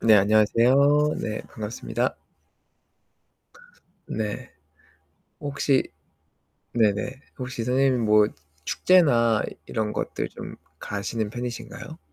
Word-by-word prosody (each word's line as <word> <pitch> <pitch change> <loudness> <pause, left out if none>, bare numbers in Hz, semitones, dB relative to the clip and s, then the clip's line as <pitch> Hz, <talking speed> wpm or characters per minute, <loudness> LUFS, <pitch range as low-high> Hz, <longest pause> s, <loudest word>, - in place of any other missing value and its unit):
네 110 -2 +6
안녕하세요. 125 +9 +4
네 105 -1 -3
반갑습니다. 110 +1 -3 1.9
네. 105 -2 -4 0.9
혹시 140 -1 +1 0.9
네네 115 +4 +1 0.2
혹시 125 -2 -4
선생님 130 0 +2
뭐 105 -1 +5 0.4
축제나 120 -12 +4 0.2
이런 110 -2 -2
것들 - - -3
좀 - - -9 0.2
가시는 105 +1 -3
편이신가요? 125 +6 -7
115 Hz, 195 characters per minute, -25 LUFS, 110-135 Hz, 1.9 s, 네